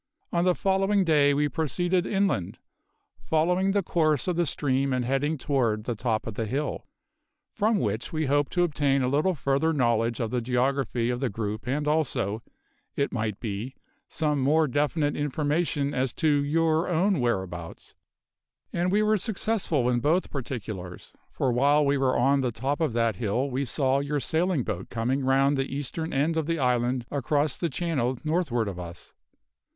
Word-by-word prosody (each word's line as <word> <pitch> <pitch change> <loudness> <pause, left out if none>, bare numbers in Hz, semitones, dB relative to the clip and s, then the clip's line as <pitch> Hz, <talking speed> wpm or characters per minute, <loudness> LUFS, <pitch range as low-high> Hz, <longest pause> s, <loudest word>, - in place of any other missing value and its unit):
On 170 0 +2
the 180 -1 +3
following 195 +1 +2
day 150 -4 +4
we 145 +1 +2
proceeded 175 +6 0
inland, 195 - 0 0.6
following 180 +5 +1
the 200 0 +1
course 155 -4 +1
of 180 - 0
the 170 -1 +1
stream 135 -1 0
and 125 -1 0
heading 140 +5 0
toward 120 -7 0
the 120 - -2
top 110 0 -1
of 115 - -4
the 110 +1 -3
hill, 145 +6 -3 0.6
from 220 0 +1
which 110 - -2
we 155 -1 -1
hoped 145 0 +1
to 175 - +3
obtain 140 -5 +1
a - - +1
little 150 +8 +1
further 140 +3 +1
knowledge 120 -5 +1
of 115 -3 -2
the 125 -1 0
geography 125 -1 0
of 120 - -3
the 135 -2 0
group 110 +2 -4
and 145 +3 -1
also, 130 -9 0 0.5
it 140 - 0
might 110 -4 -2
be, 110 +4 -5 0.3
some 150 -3 0
more 155 +4 +3
definite 145 +2 0
information 145 0 -1
as 130 -1 -1
to 160 - 0
your 155 +3 +2
own 180 +1 +2
whereabouts. 95 -8 -3 0.8
And 175 +1 0
we 210 +2 +3
were 215 0 +2
successful 190 - 0
in 125 -1 +2
both 160 +9 +1
particulars, 110 -9 -6 0.2
for 130 - 0
while 145 +4 +3
we 140 0 +2
were 130 -1 +2
on 135 +3 +3
the 125 -2 0
top 135 +7 -2
of 155 -7 +1
that 115 -4 +1
hill 120 +6 -1
we 135 +2 -1
saw 135 +2 +1
your 145 +1 -1
sailing 160 0 0
boat 95 -3 -5
coming 125 +4 -1
round 135 +2 +3
the 135 0 -2
eastern 160 +4 -3
end 155 +4 +1
of 160 -2 -1
the 165 0 0
island 125 -2 +1
across 145 +1 0
the 170 - -2
channel 135 -5 -1
northward 155 - 0
of 95 -3 -5
us. 85 0 -9
140 Hz, 175 wpm, -26 LUFS, 120-160 Hz, 0.8 s, day